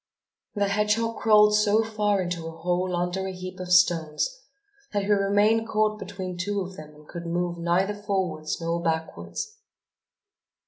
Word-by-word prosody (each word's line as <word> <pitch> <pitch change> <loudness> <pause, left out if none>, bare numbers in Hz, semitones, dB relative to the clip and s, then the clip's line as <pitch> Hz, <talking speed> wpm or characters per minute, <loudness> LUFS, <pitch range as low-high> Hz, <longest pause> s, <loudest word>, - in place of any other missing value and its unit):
The 200 -1 +1
hedgehog 210 +3 +1
crawled 210 -1 +5
so 210 +1 +4
far 210 -3 0
into 175 -2 -4
a 165 0 -8
hole 180 +2 0
under 180 +2 -1
a - - -3
heap 185 0 -8
of 180 -1 -5
stones 165 -4 +3 0.7
that 205 -1 +1
he 205 - 0
remained 205 +3 +3
caught 215 -1 +1
between 185 -4 -6
two 200 +2 -1
of 185 0 -6
them 150 -2 -11
and 150 0 -17
could 170 0 -7
move 175 0 -1
neither 175 +4 +1
forwards 190 -7 -2
nor 170 0 -1
backwards. 165 - -3
185 Hz, 155 wpm, -26 LUFS, 175-210 Hz, 0.7 s, crawled